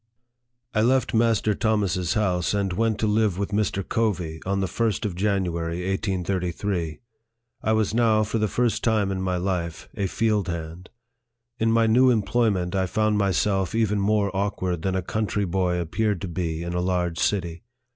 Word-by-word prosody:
I 110 - +2
LEFT 130 +2 +2
Master 110 -2 +2
Thomas's 100 -5 0
house, 90 -3 +1
and 100 -2 0
went 110 +2 +1
to - - +2
live 105 -2 +2
witfo 100 +2 -3
Mr. 100 -2 -1
Covey, 90 -8 -1
on 100 0 0
the 95 - +1
1st 115 +3 -1
of 100 - -2
January, 90 -3 -1
1833. 90 -3 -2 0.6
I 110 - +1
was 110 -1 +1
now, 110 -2 +3
for 110 +2 -2
the 110 - +2
first 120 +2 0
time 110 -4 +2
in 95 -1 -2
my 90 -1 -1
life, 90 -3 -3
a 100 - -1
field 105 -1 0
hand. 85 +1 -6 0.7
In 115 0 +2
my 115 0 +4
new 125 +4 +5
employment, 110 -5 +1
I 95 -1 +1
found 110 +2 +1
myself 95 0 +1
even 105 -2 +1
more 100 -1 +1
awkward 95 -3 -1
than 95 +2 -1
a 95 - -1
country 105 +1 -1
boy 90 -1 0
appeared 100 +4 -1
to 100 - -3
be 85 -1 -3
in 85 0 -4
a 90 - 0
large 90 -2 -1
city. 85 -4 -1
100 Hz, 175 wpm, -24 LUFS, 90-110 Hz, 0.7 s, new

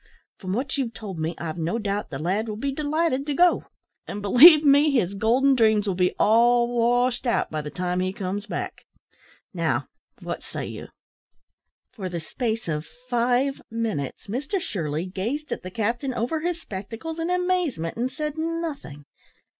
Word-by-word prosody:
From 185 -2 -4
what 260 +5 -2
you've 240 -4 -2
told 195 -6 -7
me, 160 +2 -2
I've 165 0 -5
no 165 +7 -1
doubt 205 -2 -2
the 135 - -5
lad 190 +9 -1
will 210 - -3
be 275 +6 -2
delighted 300 -1 0
to 290 - -1
go. 355 +2 +4 0.4
And, 205 - -5
believe 295 - +8
me, 285 +2 +6
his 225 -10 +1
golden 240 +7 +3
dreams 220 -4 +3
will 195 - +1
be 180 0 +1
all 235 +2 +4
washed 245 +2 +2
out 235 - +1
by 155 -1 -2
the 150 - -6
time 180 +3 -2
he 185 0 0
comes 195 +1 -4
back. - - -5 0.7
Now, - - -1 0.3
what - - -5
say - - -6
you!" - - -7 1.0
For 190 -4 -5
the 175 -1 -3
space 225 +6 -3
of 155 -1 -2 0.2
five 245 +3 +1
minutes 220 - -3
Mr 285 - -2
Shirley 165 - -3
gazed 225 +11 -4
at - - -2
the 185 - -7
captain 235 +6 -2
over 245 +8 -1
his 340 +1 -2
spectacles 225 - -6
in 330 +1 -1
amazement, 360 - 0
and 245 +3 -1
said 300 +2 -4
nothing. 315 - -4
230 Hz, 170 wpm, -25 LUFS, 190-280 Hz, 1.0 s, believe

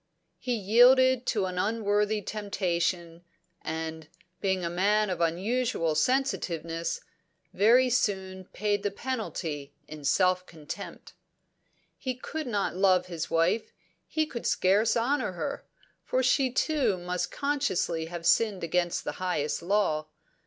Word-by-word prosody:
He 250 -1 -1
yielded 250 +4 +5
to 205 -4 +1
an 180 -1 -3
unworthy 210 0 +1
temptation, 175 -5 -2 0.4
and, 160 0 -5 0.3
being 190 -2 0
a - - 0
man 205 +3 +2
of 180 - -3
unusual 185 +1 0
sensitiveness, 170 - -1 0.5
very 235 +6 +5
soon 190 -5 -1
paid 205 +1 -1
the 205 - 0
penalty 175 - -4
in 150 -1 -9
self 185 +5 +2
contempt. 155 -3 -9 0.9
He 255 -2 -3
could 310 +3 -5
not 205 -6 -1
love 185 -1 +3
his 170 -3 -5
wife; 165 +7 +1 0.4
he 315 -1 0
could 245 -6 -5
scarce 205 +5 +3
honour 255 -2 0
her 280 +11 -4 0.4
for 255 - 0
she 260 0 +3
too 260 - +1
must 180 0 -3
consciously 275 - -1
have 170 0 -7
sinned 210 -3 +3
against 175 +1 0
the - - -3
highest 165 -5 -1
law. 170 -5 +1
195 Hz, 125 wpm, -28 LUFS, 170-235 Hz, 0.9 s, yielded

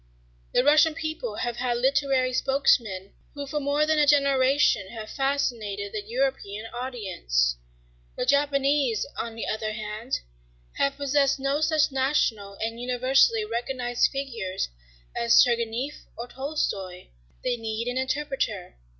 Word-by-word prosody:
The 250 - +3
Russian 305 +2 +5
people 315 -9 -4
have 240 +1 -3
had 245 -1 0
literary 265 0 +2
spokesmen 230 -8 +1 0.2
who 285 -1 -5
for 295 +2 -2
more 290 +1 +1
than 310 0 +2
a 295 - +4
generation 275 -6 +3
have 220 -1 -8
fascinated 230 -8 -1
the 215 - -2
European 225 -2 -2
audience. 190 - -1 0.6
The - - -2
Japanese, 280 -4 +2
on 230 -1 -4
the 225 - -4
other 215 0 -2
hand, 215 +3 -4 0.6
have 280 0 +1
possessed 280 -1 +2
no 275 +2 0
such 310 -2 +2
national 260 -7 0
and 225 +3 -4
universally 260 - +3
recognized 245 - 0
figures 230 - -3 0.5
as 235 0 +5
Turgenieff 235 +4 -2
or 235 - -5
Tolstoy. 225 -10 -4 0.3
They 250 -1 +1
need 225 0 -4
an 250 +1 -1
interpreter. 265 - -2
255 Hz, 130 wpm, -26 LUFS, 220-280 Hz, 0.6 s, Russian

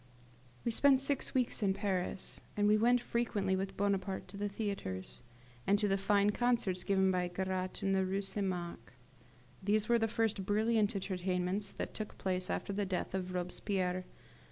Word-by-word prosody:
We 235 - +2
spent 270 +3 +5
six 275 0 -1
weeks 250 -2 +2
in 195 -2 +2
Paris, 190 -2 -2 0.2
and 205 0 +3
we 210 - +6
went 240 +3 +4
frequently 210 -6 0
with 195 +1 -3
Bonaparte 195 -1 0
to - - -9
the 205 0 -1
theatres, 195 - -4 0.5
and 200 +1 +5
to 205 0 +1
the 195 - +3
fine 200 +1 +3
concerts 220 -6 +1
given 190 0 +3
by 180 -1 +1
Garat 185 +1 -3
in 195 - +2
the 190 0 +3
Rue 195 +2 -1
St. 195 +1 -1
Marc. 175 -10 -5 0.7
These 210 +2 +2
were 235 0 +5
the 225 - +2
first 220 -3 0
brilliant 215 +1 +2
entertainments 185 +1 -1
that - - -5
took 215 -1 -6
place 185 0 -1
after 200 - -2
the 205 +1 0
death 185 -2 -2
of 185 -1 -3
Robespierre. 180 0 -1
195 Hz, 175 wpm, -34 LUFS, 185-210 Hz, 0.7 s, we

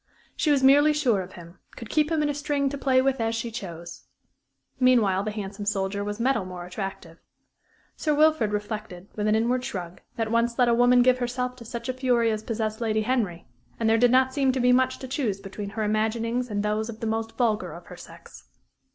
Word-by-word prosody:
She 310 - 0
was 280 -2 +3
merely 290 +3 +6
sure 250 -10 +1
of 185 0 -10
him; 170 0 -13 0.2
could 230 - -9
keep 305 +1 +1
him 315 -2 +1
in 295 - 0
a - - 0
string 285 -1 -1
to 280 - -5
play 260 -1 +3
with 270 -2 0
as 225 0 0
she 230 +1 -4
chose. 170 -6 -8 0.7
Meanwhile 230 -7 +4
the 210 - -3
handsome 205 -1 -6
soldier 200 0 -1
was 205 +1 -5
metal 255 -3 +1
more 180 -1 -8
attractive. 180 -3 -7 0.8
Sir 300 -2 0
Wilfrid 305 -8 +3
reflected, 205 -3 -5
with 210 0 -1
an 215 - +3
inward 245 +3 +1
shrug, 185 -9 -6
that, 225 -1 -2
once 235 0 +1
let 245 - +4
a 235 - +4
woman 245 +1 +5
give 255 0 +3
herself 250 +1 -2
to 235 - -11
such 235 0 -6
a 255 - -1
fury 245 -3 +1
as 215 -1 -2
possessed 220 0 -3
Lady 220 -1 0
Henry, 215 -8 -1 0.3
and 225 - +1
there 225 0 +3
did 245 +1 +5
not 260 +1 +3
seem 270 -2 +2
to 260 - -1
be 250 0 +4
much 260 +1 +2
to 260 - -8
choose 250 -7 -2
between 200 +1 -7
her 215 +2 -3
imaginings 225 +3 -1
and 205 -1 -2
those 215 +1 -1
of 225 -1 -8
the - - -4
most 225 0 -3
vulgar 220 -4 0
of - - -11
her - - -11
sex. - - -14
230 Hz, 220 wpm, -25 LUFS, 210-255 Hz, 0.8 s, merely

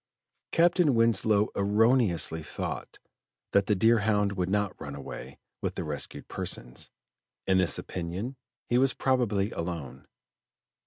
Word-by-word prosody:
Captain 170 -4 +4
Winslow 110 -2 +3
erroneously 100 - +2
thought - - -6 0.5
that 100 -1 +3
the 105 - +3
Deerhound 105 -1 +3
would 95 -2 -2
not 105 -1 0
run 70 -1 -6
away 65 -1 -8 0.2
with - - -2
the - - -3
rescued 75 -2 -3
persons: - - -3 0.6
in 95 0 +3
this 90 - +3
opinion 95 +9 -5 0.3
he 120 - +2
was 135 0 +3
probably 115 -6 +1
alone. 85 -4 -6
100 Hz, 120 wpm, -28 LUFS, 85-115 Hz, 0.6 s, Captain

